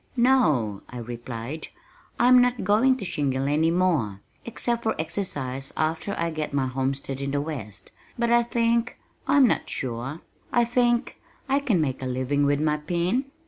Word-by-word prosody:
"No," 155 - +3
I 125 - -8
replied, 120 +4 -6 0.5
"I'm 250 +1 +7
not 245 0 +1
going 225 +7 +4
to 200 - -6
shingle 135 -5 -1
any 155 +3 +2
more 160 - +1 0.2
except 235 0 -2
for 220 - 0
exercise 145 -6 -3
after 160 +5 -1
I 170 0 -1
get 155 -2 -3
my 135 -2 +2
homestead 135 +1 -2
in 140 - -2
the 145 +1 0
west 140 -9 -6 0.3
but 235 0 +1
I 240 0 +6
think 235 0 0 0.3
I'm 280 0 +6
not 235 - 0
sure 130 +5 -4 0.3
I 240 -1 +3
think 240 0 +1 0.3
I 275 +1 +2
can 235 -10 +1
make 135 -5 -1
a 130 - -3
living 130 +3 0
with 145 0 +2
my 150 0 +1
pen." 175 - -1
155 Hz, 165 wpm, -25 LUFS, -, 0.5 s, I'm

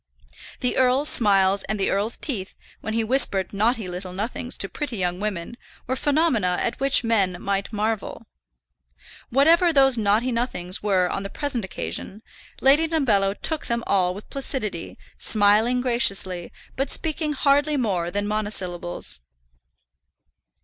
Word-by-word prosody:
The 250 - 0
earl's 260 +3 +3
smiles 195 -3 +4
and 215 0 -3
the 195 - +1
earl's 205 +4 +1
teeth, 210 -10 -3 0.2
when 220 +1 -4
he 225 - +1
whispered 220 -6 +1
naughty 220 +1 0
little 180 +1 -6
nothings 225 +5 -4
to 195 - -2
pretty 255 +1 -5
young 180 -1 -2
women, 210 +1 -4 0.3
were 260 - -2
phenomena 270 - +1
at 235 - -2
which 275 -1 +4
men 195 -6 +1
might 200 +1 -2
marvel. 220 +1 -3 1.0
Whatever 330 +7 +4
those 270 -5 +4
naughty 215 +4 +2
nothings 210 -7 -2
were 190 -3 +2
on 195 - -3
the 195 - -6
present 265 -4 -2
occasion, 190 +2 -5 0.4
Lady 290 +5 +4
Dumbello 215 -12 +1
took 315 -2 -2
them 235 0 -1
all 180 -2 +1
with 205 - -10
placidity, 235 -10 -4 0.2
smiling 215 +4 +3
graciously, 195 -8 +1 0.2
but 270 +1 -2
speaking 310 -1 -1
hardly 290 +1 +2
more 190 -9 -1
than 205 +3 -2
monosyllables. 180 - -2
215 Hz, 140 wpm, -23 LUFS, 195-260 Hz, 1.0 s, smiles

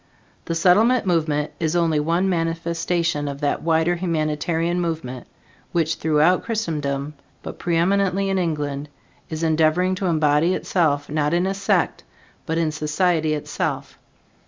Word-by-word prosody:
The 165 - -2
Settlement 210 +9 +4
movement 155 -4 0
is 160 0 0
only 165 -3 +2
one 170 +5 +1
manifestation 165 -2 -1
of 140 0 -5
that 145 - 0
wider 165 +1 +2
humanitarian 165 0 -1
movement 155 -7 -4 0.5
which 165 -2 +1
throughout 160 +3 +2
Christendom, 150 -10 -2 0.3
but - - -8
pre 170 -1 0
eminently 195 +2 +1
in 195 -1 0
England, 150 -4 -2 0.4
is 160 0 -4
endeavoring 160 +3 +2
to 185 0 -2
embody 155 +1 +2
itself, 145 -5 0
not 150 +1 0
in 175 +1 +1
a 195 - 0
sect, 195 +1 0 0.4
but 160 0 -1
in 165 -2 +1
society 155 +1 0
itself. 150 - -4
165 Hz, 135 wpm, -22 LUFS, 150-175 Hz, 0.5 s, Settlement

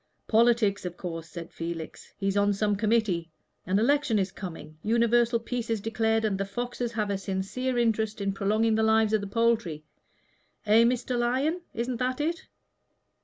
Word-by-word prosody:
"Politics, 225 -3 +3
of 180 -1 -5
course," 165 -2 -6
said 170 +1 -8
Felix. 165 -1 -6
"He's 195 0 -1
on 205 0 +3
some 205 +1 +1
committee. 210 -6 +1 0.4
An 190 +2 +2
election 275 +1 +2
is 190 -1 0
coming. 165 -5 -9
Universal 235 +2 +2
peace 235 0 -4
is 225 -1 0
declared, 225 +1 0
and 195 -3 0
the - - +1
foxes 240 +3 -4
have 210 -2 -1
a 195 - -1
sincere 195 +7 -2
interest 220 -2 +1
in 200 -1 -1
prolonging 215 +3 +1
the 220 - +2
lives 220 0 +3
of 215 - +3
the 200 - -5
poultry. 220 -8 0 0.8
Eh, 215 +2 +6
Mr. 250 +1 0
Lyon? 265 +9 0
Isn't 240 +1 -2
that 255 +2 -1
it?" 330 +4 -2
220 Hz, 170 wpm, -27 LUFS, 195-235 Hz, 0.8 s, Eh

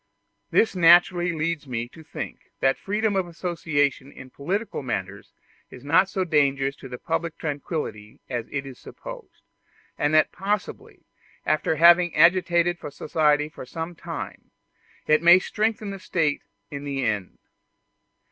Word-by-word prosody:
This 220 - +2
naturally 175 +1 +5
leads 160 -2 -2
me 120 -2 -3
to 160 - -14
think - - -8
that 135 0 +2
freedom 210 +1 -1
of 190 -2 0
association 155 -6 -1
in 130 0 -12
political 195 +10 -3
matters 100 -6 -5 0.4
is 125 - -13
not 165 +7 +3
so 190 -1 -1
dangerous 140 -4 +1
to 130 -2 -8
public 165 +2 -3
tranquillity 145 - -5
as 120 -2 -4
is 135 -2 -6
supposed; - - -11 0.6
and 145 - +1
that 155 - +4
possibly, 200 +2 -4 0.4
after 155 +1 +1
having 175 +2 +6
agitated 175 +1 +3
society 150 0 +1
for 155 - -10
some 165 +5 -5
time, - - -8 0.6
it 155 0 +3
may 170 +1 +8
strengthen 215 +2 -2
the 195 - -7
State 160 -5 0 0.3
in 140 -1 -6
the 135 -2 -2
end. 105 -5 -2
160 Hz, 135 wpm, -24 LUFS, 140-175 Hz, 0.6 s, may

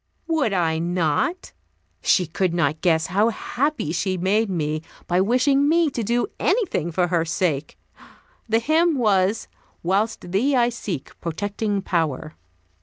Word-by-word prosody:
Would 320 -9 +1
I 165 -4 +1
not? 175 - -1 0.5
She 180 - +3
could 170 +2 -1
not 155 -2 0
guess 160 -3 +2
how 205 +5 +2
happy 270 - -2
she 185 +2 -1
made 200 +5 +1
me 155 -4 -2 0.2
by 180 +1 +2
wishing 270 +7 +3
me 330 -2 +3
to 240 - -3
do 240 +3 +1
anything 380 - 0
for 175 +1 +1
her 170 -2 +2
sake. 155 -3 -2 0.7
The 225 - +4
hymn 315 +6 +2
was, 205 -3 +2 0.4
"Whilst 195 +1 -1
Thee 255 +9 +2
I 240 -1 +3
seek, 195 - -5
protecting 205 +4 -2
Power." 155 -5 -1
195 Hz, 140 wpm, -23 LUFS, 170-240 Hz, 0.7 s, The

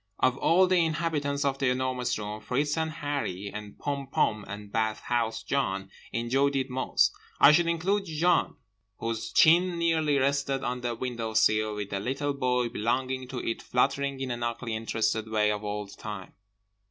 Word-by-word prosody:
Of 130 -1 +3
all 185 +3 +5
the 180 -2 +3
inhabitants 155 -3 -1
of 135 -1 0
The 135 - +2
Enormous 125 -1 -1
Room, 105 0 -5
Fritz 145 +5 0
and 160 -1 0
Harree 145 - -3
and 105 -1 -8
Pom 140 -1 -3
Pom 105 -5 +1
and 105 0 -8
Bathhouse 110 +1 -1
John 95 -9 -1 0.2
enjoyed 135 +4 +1
it 135 -1 -1
most. 130 +1 +2 0.3
I 140 - +9
should 170 +3 +4
include 190 +5 0
Jan, 165 +1 +1 0.4
whose 115 0 -3
chin 175 +2 +5
nearly 160 -3 +2
rested 140 0 +1
on 125 0 -2
the 120 -1 -2
window 115 -3 -4
sill 110 -1 +3
with 105 -1 -5
the 100 - -1
little 135 +6 -2
body 125 -3 0
belonging 130 +3 -1
to 125 -1 -5
it 115 - -2
fluttering 140 +2 0
in 130 -2 -3
an 120 0 -4
ugly 120 -1 -2
interested 110 0 -1
way 105 -1 +2
all 105 0 -4
the 100 - -13
time. 105 -4 -7
130 Hz, 170 wpm, -28 LUFS, 110-145 Hz, 0.4 s, I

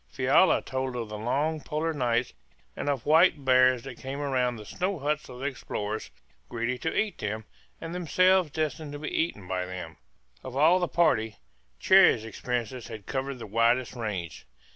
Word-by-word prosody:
Fiala - - +3
told 130 -1 -3
of 115 -3 -4
the 105 - -5
long 150 +7 -1
polar 160 +2 -2
nights 120 -3 0 0.4
and - - -3
of 140 -4 -2
white 160 -2 +4
bears 130 -1 +4
that 135 -3 -9
came 135 +2 -5
round 130 -4 0
the 105 - -10
snow 185 - -2
huts 150 0 -2
of 125 - -9
the 135 - -6
explorers, 110 -6 -4 0.4
greedy 120 +2 -2
to 160 - -2
eat 215 -1 -2
them, 110 +1 -4 0.3
and 165 +1 -6
themselves 185 0 +3
destined 155 0 -3
to - - -5
be 150 +1 -5
eaten 105 - -1
by 90 -1 -1
them. 90 -4 -7 0.5
Of 130 - -7
all 165 +6 +5
the 175 - 0
party 110 -12 +2 0.4
Cherrie's 180 - +5
experiences 120 +1 -4
had 110 -4 -9
covered 135 0 -3
the 120 - -8
widest 115 +4 +2
range. 100 - -5
130 Hz, 175 wpm, -27 LUFS, 115-155 Hz, 0.5 s, all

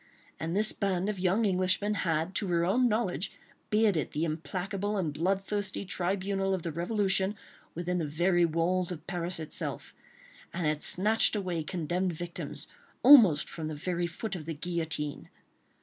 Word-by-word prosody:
And 165 +2 -3
this 215 +1 +4
band 195 -1 -1
of 205 -3 -3
young 190 +5 +2
Englishmen 185 +2 +1
had, 165 -2 -1
to 200 - +2
her 170 -1 +2
own 245 +7 +3
knowledge, 210 -3 -1 0.4
bearded 210 -7 +2
the 155 - -1
implacable 190 +6 -3
and 165 -6 -1
bloodthirsty 195 +4 -1
tribunal 195 +1 -1
of 180 - -6
the 170 - -3
Revolution, 195 +3 0 0.4
within 175 +1 -1
the 160 - -1
very 175 +4 +2
walls 170 +2 +1
of 160 -2 -7
Paris 175 -1 -3
itself, 155 -1 -5 0.6
and 175 - -3
had 150 0 0
snatched 215 +4 +3
away 180 -5 -2
condemned 175 +2 -2
victims, 175 +2 -5 0.4
almost 220 - +8
from 160 -2 -5
the 155 - -4
very 175 +3 -2
foot 195 +5 -5
of 160 -4 -7
the 165 0 -4
guillotine. 160 -3 -3
180 Hz, 155 wpm, -30 LUFS, 165-195 Hz, 0.6 s, almost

